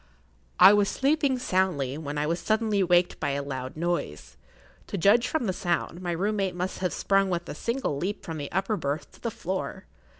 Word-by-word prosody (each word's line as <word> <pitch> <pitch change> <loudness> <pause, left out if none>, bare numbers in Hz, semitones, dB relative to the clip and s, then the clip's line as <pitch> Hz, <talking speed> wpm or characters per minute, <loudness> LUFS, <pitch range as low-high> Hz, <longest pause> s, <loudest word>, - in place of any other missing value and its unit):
I 190 +3 +10
was 205 -1 +3
sleeping 280 -1 +1
soundly 185 - 0
when 150 -1 -5
I 150 - 0
was 165 +3 -1
suddenly 215 -2 +1
waked 175 -1 +3
by 145 -3 -1
a 140 0 -2
loud 130 0 -5
noise. 170 - -3 0.5
To - - -4
judge 215 +7 +4
from 315 -4 -1
the 190 - 0
sound, 175 0 -2
my 175 -1 -2
room 200 +5 -1
mate 190 -3 -1
must 180 +1 -3
have 185 -1 -1
sprung 195 -1 +2
with 175 -1 -2
a - - -5
single 235 - -2
leap 195 +7 -3
from 160 -2 -5
the 145 - -5
upper 195 +2 0
berth 145 +1 -3
to - - -19
the 235 - -1
floor. 190 -3 -4
185 Hz, 205 wpm, -27 LUFS, 160-205 Hz, 0.5 s, I